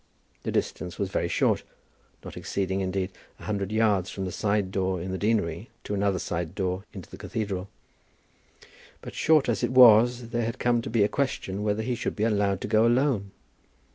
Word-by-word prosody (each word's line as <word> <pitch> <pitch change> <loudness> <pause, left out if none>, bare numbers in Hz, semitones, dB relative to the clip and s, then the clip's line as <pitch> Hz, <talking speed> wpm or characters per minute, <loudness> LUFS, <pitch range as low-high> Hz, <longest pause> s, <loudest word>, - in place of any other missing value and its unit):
The - - -3
distance 90 -1 -2
was 100 -2 -2
very 85 - 0
short, - - +1 0.6
not - - -8
exceeding, 95 0 -2
indeed, 95 0 -2 0.3
a - - -13
hundred 100 -2 -2
yards 105 -4 +2
from 95 - -4
a 90 - -4
side 100 -1 0
door 95 -1 -1
in 90 +2 -5
the 95 - -2
deanery 105 -3 0
to - - -4
another 100 -1 +1
side 85 0 -4
door 95 0 -2
into 95 -5 -9
the - - -9
cathedral; 100 -3 -4 1.3
but - - -8
short 155 -3 +3
as 115 -4 0
it - - +2
was 120 -1 +6
there 120 0 -1
had 115 - -3
come 120 -1 +2
to - - -6
be 110 -2 +3
a - - +4
question 105 -7 -2
whether 105 +1 0
he 125 +2 -1
should 120 - -3
be 105 - -1
allowed 100 -3 +1
to - - -3
go 110 +2 +4
alone. 120 -5 +1
100 Hz, 195 wpm, -26 LUFS, 95-115 Hz, 1.3 s, was